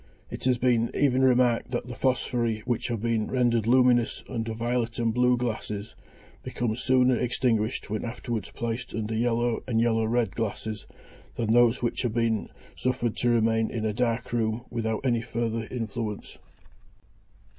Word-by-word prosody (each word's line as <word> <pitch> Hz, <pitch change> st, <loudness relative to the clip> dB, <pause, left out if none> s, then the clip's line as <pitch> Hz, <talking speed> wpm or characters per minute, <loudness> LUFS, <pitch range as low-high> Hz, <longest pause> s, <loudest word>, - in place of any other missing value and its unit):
It -, -, -6 dB
has 125 Hz, -1 st, +3 dB
been 120 Hz, -2 st, +2 dB
even 130 Hz, -2 st, +3 dB
remarked 125 Hz, -2 st, +3 dB
that 120 Hz, -1 st, -2 dB
the 125 Hz, -, -7 dB
phosphori 120 Hz, -3 st, 0 dB
which 120 Hz, 0 st, -2 dB
have 115 Hz, -3 st, -3 dB
been 115 Hz, -2 st, 0 dB
rendered 120 Hz, -3 st, +1 dB
luminous 125 Hz, -1 st, +3 dB
under 115 Hz, -3 st, -3 dB
violet 115 Hz, +1 st, -1 dB
and 115 Hz, -1 st, +1 dB
blue 125 Hz, +1 st, +3 dB
glasses, 110 Hz, -3 st, -4 dB, 0.5 s
become 120 Hz, -3 st, -2 dB
sooner 130 Hz, +1 st, +3 dB
extinguished 115 Hz, -3 st, 0 dB
when 110 Hz, -, -2 dB
afterwards 115 Hz, -1 st, -4 dB
placed 120 Hz, +1 st, -4 dB
under 110 Hz, 0 st, -2 dB
yellow 120 Hz, +1 st, +1 dB
and 115 Hz, -3 st, +1 dB
yellow 115 Hz, -1 st, +2 dB
red 115 Hz, +1 st, +1 dB
glasses 110 Hz, -1 st, -4 dB, 0.5 s
than 115 Hz, -2 st, -1 dB
those 120 Hz, +1 st, +4 dB
which 120 Hz, -, -1 dB
have 120 Hz, -3 st, -2 dB
been 115 Hz, -2 st, 0 dB, 0.3 s
suffered 125 Hz, -3 st, -1 dB
to 120 Hz, -, +1 dB
remain 115 Hz, -1 st, +2 dB
in 110 Hz, -2 st, -3 dB
a 110 Hz, -, 0 dB
dark 115 Hz, 0 st, -1 dB
room 110 Hz, 0 st, 0 dB
without 110 Hz, 0 st, -2 dB
any 120 Hz, -3 st, +2 dB
further 115 Hz, -1 st, -2 dB
influence. 115 Hz, -3 st, -5 dB
115 Hz, 155 wpm, -27 LUFS, 115-125 Hz, 0.5 s, those